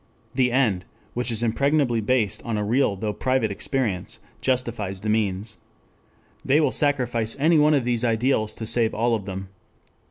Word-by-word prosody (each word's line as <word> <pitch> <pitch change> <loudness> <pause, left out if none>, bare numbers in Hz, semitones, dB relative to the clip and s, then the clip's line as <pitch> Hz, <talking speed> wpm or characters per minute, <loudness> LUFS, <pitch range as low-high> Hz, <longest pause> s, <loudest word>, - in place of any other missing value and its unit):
The 125 -1 +2
end, 115 -8 +1 0.3
which 125 +1 -2
is 115 0 -1
impregnably 130 0 +1
based 110 -2 +1
on 115 -3 -2
a 105 - -1
real 115 0 +2
though 105 +2 -3
private 130 -3 0
experience 105 -3 -2 0.2
justifies 115 -7 -1
the 110 - -3
means. 105 0 -1 0.8
They 145 +3 +3
will 150 -4 +2
sacrifice 120 -6 0
any 155 +3 +4
one 150 +1 +5
of 135 - +1
these 120 -1 0
ideals 115 -2 +1
to 110 - -6
save 115 0 +2
all 115 +2 +1
of 105 -4 -2
them 95 -1 -6
115 Hz, 165 wpm, -24 LUFS, 105-130 Hz, 0.8 s, one